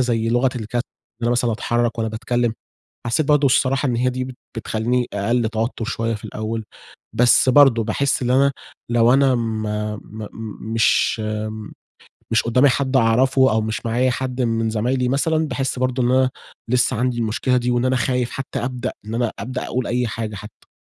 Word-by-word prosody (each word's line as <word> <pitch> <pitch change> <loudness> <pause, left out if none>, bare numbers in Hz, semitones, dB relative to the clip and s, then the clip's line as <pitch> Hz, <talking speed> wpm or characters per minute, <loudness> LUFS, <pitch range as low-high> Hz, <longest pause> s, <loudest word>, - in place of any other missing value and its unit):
زي 115 -3 +1
لغة 120 +2 +2
الج 110 - -5
إن 120 - +2 0.4
أنا 120 - +1
مثلًا 120 -1 +1
أتحرك 120 +1 -1
وأنا 110 -1 0
باتكلم، 120 +1 -1 0.5
حسيت 130 +6 +1
برضه 150 -1 +4
الصراحة 135 +2 +2
إن 120 - 0
هي 125 +2 +1
دي 130 0 -3
بت 130 -1 -8 0.2
بتخلّيني 120 +3 -1
أقل 110 +3 0
توتر 115 +1 -2
شوية 115 -1 -2
في 105 - -11
الأول، 110 0 -4 0.5
بس 120 +3 +4
برضه 130 -4 +6
باحس 135 +5 0
إن 120 - -1
أنا 140 +2 +4 0.4
لو 120 +1 +4
أنا 135 -1 +4
م 110 -2 -2 0.4
م 110 -1 -9 0.4
مش 115 0 +2 1.1
مش 110 - +3
قدامي 125 +4 +4
حد 135 0 0
أعرفه 130 +3 +4
أو 110 - +2
مش 110 0 -3
معايا 125 +3 +2
حد 130 0 -2
من 115 -1 0
زمايلي 125 +3 0
مثلًا، 155 +3 +1
باحس 135 -2 -2
برضه 130 0 0
إن 120 - +2
أنا 130 0 +3 0.4
لسه 125 -1 +2
عندي 125 -1 0
المشكلة 115 +3 0
دي 125 0 0
وإن 120 +1 +1
أنا 130 0 +2
خايف 125 0 0
حتى 135 0 -5
أبدأ 125 -1 -3
إن 110 - -5
أنا 120 -1 0
أبدأ 125 +6 -4
أقول 125 0 -2
أي 125 0 0
حاجة 110 0 -4
حتى. 105 +2 -12
120 Hz, 180 wpm, -21 LUFS, 115-130 Hz, 1.1 s, برضه